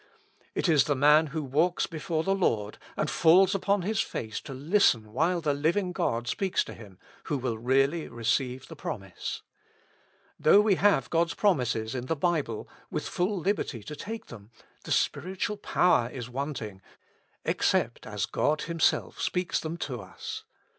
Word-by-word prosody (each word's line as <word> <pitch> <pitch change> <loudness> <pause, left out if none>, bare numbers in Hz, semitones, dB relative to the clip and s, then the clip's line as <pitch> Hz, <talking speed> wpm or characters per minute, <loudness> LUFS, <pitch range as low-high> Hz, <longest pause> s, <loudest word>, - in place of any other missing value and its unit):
It - - 0
is 155 -4 +5
the 145 - +1
man 150 +3 +5
who 155 +1 -3
walks 155 +7 +1
before 160 0 -2
the 195 - +1
Lord, 110 - 0 0.2
and 150 - 0
falls 170 +8 +5
upon 195 0 +1
his 210 +2 -1
face 110 -2 -4
to 140 - -9
listen 130 - +2
while 170 +6 +1
the 150 -3 +1
living 170 +6 +1
God 120 -8 -1
speaks 190 +9 0
to - - -9
him, 100 -5 -13 0.3
who 145 - -1
will 120 -4 -3
really 135 +7 +2
receive 120 +3 -1
the - - -10
promise. 95 -3 -5 1.0
Though 200 - +6
we 210 -1 +4
have 190 - +2
God's 170 0 +1
promises 125 - +1
in 125 -1 -4
the 165 - 0
Bible, 150 -8 -1 0.2
with - - -3
full 190 +3 -1
liberty 180 - -1
to 150 - -7
take 220 +9 -6
them, 105 -3 -12 0.4
the - - -6
spiritual 185 +7 0
power 180 - +2
is 125 -1 -7
wanting, 120 -8 -4 0.6
except - - 0
as - - -2
God 155 +1 0
Himself 165 -1 0
speaks 180 -1 0
them 160 +1 -4
to 125 -8 -4
us. 95 - -8
150 Hz, 160 wpm, -28 LUFS, 120-180 Hz, 1.0 s, Though